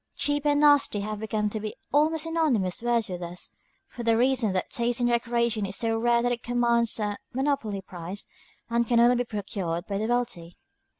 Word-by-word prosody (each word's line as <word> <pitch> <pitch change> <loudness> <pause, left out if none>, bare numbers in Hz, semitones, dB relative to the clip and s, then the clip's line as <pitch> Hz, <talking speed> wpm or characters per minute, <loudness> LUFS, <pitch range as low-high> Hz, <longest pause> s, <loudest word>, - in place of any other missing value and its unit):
"Cheap" 290 0 0
and 290 0 +3
"nasty" 290 -8 +4
have 215 +1 -5
come 210 -1 0
to 215 - -3
be 215 0 -5 0.2
almost 310 +2 +3
synonymous 290 - 0
words 235 -2 +1
with 180 -1 -6
us, 175 +1 -6 0.4
for 240 - -9
the 230 -1 +2
reason 250 -3 +2
that 185 - -2
taste 235 0 0
in 245 - +1
decoration 235 -2 +1
is 195 - -4
so 225 +1 0
rare 235 +1 +2
that 245 - +1
it 240 -1 -2
commands 235 -1 +1
a 205 -1 -2
monopoly 260 -7 -1
price, 180 +2 -7 0.4
and 235 0 0
can 235 0 +3
only 240 +1 +5
be 245 - 0
procured 195 -5 -4
by 200 -1 -3
the 220 - -1
wealthy. 210 -9 -2
235 Hz, 195 wpm, -26 LUFS, 205-245 Hz, 0.4 s, only